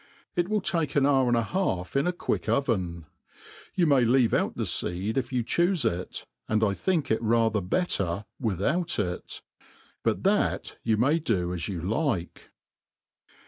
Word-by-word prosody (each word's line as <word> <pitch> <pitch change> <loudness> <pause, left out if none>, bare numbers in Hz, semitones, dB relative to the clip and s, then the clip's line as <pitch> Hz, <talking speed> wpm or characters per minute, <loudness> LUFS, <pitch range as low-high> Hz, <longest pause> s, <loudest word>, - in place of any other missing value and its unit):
It 175 +1 0
will 215 -1 +1
take 165 -5 -1
an 140 -2 +4
hour 135 -2 +3
?n.d 120 -1 +3
a 115 - +2
half 110 - -2
in 140 +4 +2
.a - - +3
j^iuick 175 - -2
oven. 95 - 0 0.7
You 180 - +3
may 140 -4 +4
leave 120 0 +3
out - - +1
the - - -2
feed 95 +6 -1
if 130 -2 -1
you 125 -2 0
choofe 170 +4 +1
it, 90 -4 -2 0.2
an4 110 -1 +2
X 100 - -6
thiok 165 -9 +1
it 110 - +1
rather 115 -2 +2
better 95 - 0
without 140 - 0
ix 90 -3 -4 0.2
j - - -27 0.4
but - - 0
iba^t - - +1
ypu 110 -1 +2
i^y 145 +8 +2
.do 90 - 0
i^ 90 - -3 0.3
yo^ 90 - -4
like. 110 - -2
120 Hz, 175 wpm, -27 LUFS, 100-150 Hz, 0.7 s, an